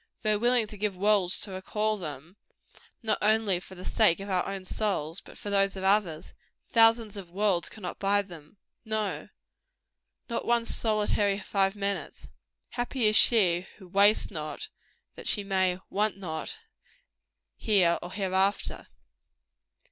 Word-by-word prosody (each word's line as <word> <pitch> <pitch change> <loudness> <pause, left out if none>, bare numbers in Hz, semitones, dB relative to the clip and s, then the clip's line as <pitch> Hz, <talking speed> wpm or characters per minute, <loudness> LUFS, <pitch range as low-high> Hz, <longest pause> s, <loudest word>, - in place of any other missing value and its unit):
Though 215 -2 +1
willing 240 0 +3
to 210 0 -10
give 205 -2 -1
worlds 195 -2 +2
to 205 - -2
recall 210 +3 -1
them 160 -2 -8 0.7
not 220 -1 +1
only 215 -3 +2
for 190 +1 -13
the 185 - -10
sake 210 -6 +3
of 195 0 -6
our 180 -1 0
own 195 -1 -5
souls, 185 -6 -2
but - - -15
for 205 - -6
those 195 0 +2
of 190 - -6
others 190 -5 +1 0.4
thousands 225 -2 +4
of 190 -3 -8
worlds 190 -1 +1
cannot 185 -5 -7
buy 200 +1 +2
them. 170 -2 -13 0.3
No, 210 -8 -2 1.0
not 235 - -2
one 235 -1 +2
solitary 210 -3 +1
five 195 -1 0
minutes. 200 -1 -3 0.4
Happy 245 0 -2
is 215 0 +4
she 185 -7 +4
who 190 - -14
"wastes 200 +4 +4
not," 155 -4 -6 0.4
that - - -9
she 205 - +1
may 190 -2 +1
"want 210 +1 0
not," 160 -5 -5 1.0
here 185 -6 +3
or 175 - -7
hereafter. 190 0 -1
200 Hz, 145 wpm, -28 LUFS, 185-215 Hz, 1.0 s, thousands